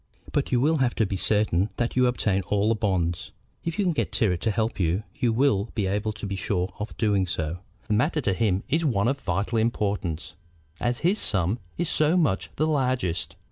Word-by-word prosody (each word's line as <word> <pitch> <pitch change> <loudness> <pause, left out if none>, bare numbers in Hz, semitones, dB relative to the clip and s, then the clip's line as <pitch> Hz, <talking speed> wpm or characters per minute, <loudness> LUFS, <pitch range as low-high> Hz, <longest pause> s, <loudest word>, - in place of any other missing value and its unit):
"But 145 - -1
you 125 - +3
will 155 +5 +3
have 130 -3 +1
to 110 - +2
be 95 - -3
certain 105 -1 +2
that 120 0 -1
you 125 0 +4
obtain 105 -5 +1
all 105 +1 +2
the - - +4
bonds. 95 -6 -1 0.3
If 165 +2 -3
you 205 - +1
can 180 - +3
get - - -1
Tyrrwhit 95 -8 +1
to 115 - +1
help 110 +1 -1
you 90 +3 +1
you 120 - +1
will 115 -4 +2
be 105 - 0
able 105 +3 -1
to 105 - -7
be 100 0 -3
sure 95 -1 -2
of 105 +1 -6
doing 100 -4 +2
so. 80 0 -3 0.3
The 105 - 0
matter 150 +8 +2
to 100 -7 +1
him 100 -1 +1
is 160 +5 +1
one 115 -8 +2
of 135 +2 0
vital 110 -1 -1
importance, 100 -9 -1 0.5
as 120 0 -1
his 200 +4 +3
sum 95 +4 +2 0.2
is 175 - 0
so 155 +2 +3
much 100 - +1
the 155 - +1
largest. 130 - 0
110 Hz, 215 wpm, -26 LUFS, 95-125 Hz, 0.5 s, you